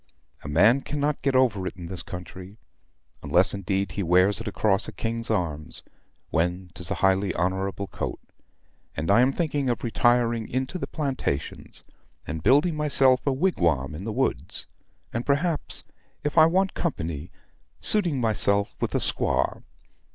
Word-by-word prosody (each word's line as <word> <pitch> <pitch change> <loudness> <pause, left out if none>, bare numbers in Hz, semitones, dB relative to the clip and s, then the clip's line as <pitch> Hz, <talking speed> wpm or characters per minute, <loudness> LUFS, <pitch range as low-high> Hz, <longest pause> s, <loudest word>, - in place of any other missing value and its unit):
A - - -8
man 105 - +4
cannot 145 +1 -2
get 135 0 0
over 110 -8 +2
it 95 - -7
in 90 - -8
this 90 +1 -5
country; 90 +2 -9 0.6
unless, - - +4
indeed, 100 0 -2
he 100 - -4
wears 95 +4 +3
it 115 - -7
across 105 -1 +1
a - - -6
king's 115 0 -3
arms, 85 -8 -3 0.5
when 90 +2 -1
'tis 90 0 +4
a - - -1
highly 95 -1 +1
honorable 95 +3 -2
coat; - - -5 0.8
and 80 +6 -1
I 105 - +5
am 130 +2 +3
thinking 145 -4 -1
of 120 - -2
retiring 120 -1 +1
into 130 +8 -3
the - - -4
plantations, 135 - -4 0.4
and 80 0 -5
building 145 - +3
myself 135 -3 +4
a - - +4
wigwam 85 - 0
in 80 +5 -7
the 110 - -4
woods, - - -2 0.5
and 120 - -2
perhaps, 150 +4 +1 0.4
if 150 - -2
I 160 -1 +7
want 190 +3 +1
company, 80 - -4 0.5
suiting 175 -10 +3
myself 100 -3 +1
with - - -2
a - - +2
squaw. - - 0
110 Hz, 155 wpm, -25 LUFS, 90-135 Hz, 0.8 s, I